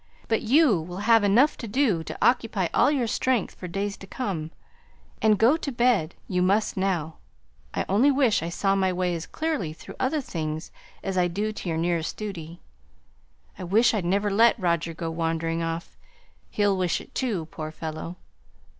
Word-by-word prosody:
But 225 - +1
you 245 - +4
will 175 +3 -7
have 225 -2 +5
enough 235 +9 +4
to 230 - -6
do 215 - +1
to - - -6
occupy 225 -7 +2
all - - +4
your 275 -5 +1
strength 240 0 0
for 180 - -8
days 195 +3 -3
to 195 - -12
come; 185 -10 -3 0.7
and 215 -1 +4
go 235 +9 +4
to 295 -4 -4
bed 235 -9 +2
you 180 -1 0
must 200 +4 +2
now. 175 -5 -1 0.6
I - - -1
only 220 +9 +4
wish 265 -5 +3
I 165 - -3
saw 195 +3 +1
my 190 -1 +2
way 180 -1 0
as 165 0 -5
clearly 305 - -2
through - - -12
other 275 +4 +1
things 160 - -4 0.3
as 190 -1 -1
I 175 - +3
do 205 +5 -2
to 200 -4 -6
your 160 - -1
nearest 165 -1 -1
duty. 175 -5 -7 1.0
I - - -5
wish 220 +7 +3
I'd 210 -4 0
never 200 +4 +1
let 230 +5 +5
Roger 170 -4 0
go 165 0 -4
wandering 165 0 -1
off; 165 0 -4 0.5
he'll 205 -2 +2
wish 180 -2 0
it - - -14
too, 215 -11 -1
poor 155 -1 -5
fellow! 155 +2 -6
195 Hz, 180 wpm, -26 LUFS, 170-225 Hz, 1.0 s, have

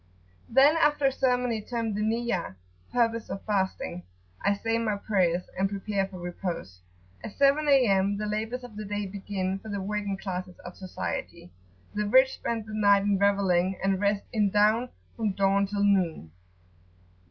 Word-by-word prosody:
Then, 275 +6 +5
after 295 -3 +2
a 270 - +4
ceremony 250 -4 0
termed 230 0 -3
the 210 - -2
Niyat[FN#6] 220 - -1 0.4
(purpose) 230 -2 0
of 195 - -6
fasting, 190 - -1 0.4
I 200 - +3
say 225 +3 -1
my 220 -3 0
[p.77]prayers, 185 -4 +1
and 195 +1 +1
prepare 200 -1 -2
for 190 -1 -10
repose.[FN#7] 175 - -5 0.5
At 210 - -9
7 280 +2 +3
A.M. 200 -7 +4
the 210 - -3
labours 220 +4 -3
of 230 -4 -11
the 215 - -5
day 205 0 -3
begin 195 -1 -3
for 220 - -10
the 200 -1 -3
working 205 0 -3
classes 185 -2 -5
of 180 - -8
society; 185 - -6 0.4
the 210 0 -1
rich 260 +4 +5
spend 225 -2 -3
the 220 - -9
night 200 -2 +4
in 200 -1 +1
revelling, 190 -2 +2
and 195 0 +1
rest 200 0 +1
in 210 -3 +2
down 215 +5 +3 0.3
from 215 -4 -1
dawn 195 +1 +2
till 200 0 -1
noon. 180 - +1
205 Hz, 165 wpm, -27 LUFS, 195-225 Hz, 0.5 s, Then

